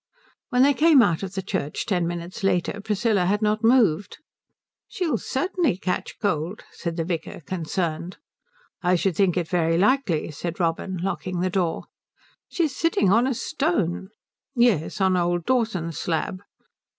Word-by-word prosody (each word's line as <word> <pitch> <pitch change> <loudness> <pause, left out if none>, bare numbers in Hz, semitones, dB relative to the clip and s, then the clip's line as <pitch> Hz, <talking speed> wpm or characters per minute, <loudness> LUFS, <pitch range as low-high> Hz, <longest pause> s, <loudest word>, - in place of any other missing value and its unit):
When 250 -2 +4
they 285 +1 +5
came 295 -2 +6
out 165 -6 +1
of 195 -1 -6
the 190 - -2
church 180 -6 -3
ten 175 -4 0
minutes 175 +2 -6
later 195 +1 0
Priscilla 210 -2 +1
had 210 +3 +1
not 215 +1 +1
moved. 220 -7 +3 0.7
"She'll 350 -5 -1
certainly 310 - 0
catch 185 -1 -3
cold," 180 0 -2
said 170 -2 -5
the 165 - -1
vicar, 170 0 -4
concerned. 170 +1 -3 0.6
"I 180 0 +3
should 180 0 0
think 185 -1 +2
it 175 -2 0
very 165 -1 +1
likely," 200 - +1
said 170 +4 -5
Robin, 175 +2 -1
locking 185 -2 -2
the 185 0 0
door. 175 -3 0 0.7
"She's 315 -6 -1
sitting 255 - +2
on 235 +5 +4
a 265 - 0
stone." 200 - -1 0.5
"Yes, 235 - +2
on 190 -1 +3
old 175 -1 0
Dawson's 190 - 0
slab." 175 +3 -2
185 Hz, 150 wpm, -24 LUFS, 170-225 Hz, 0.7 s, came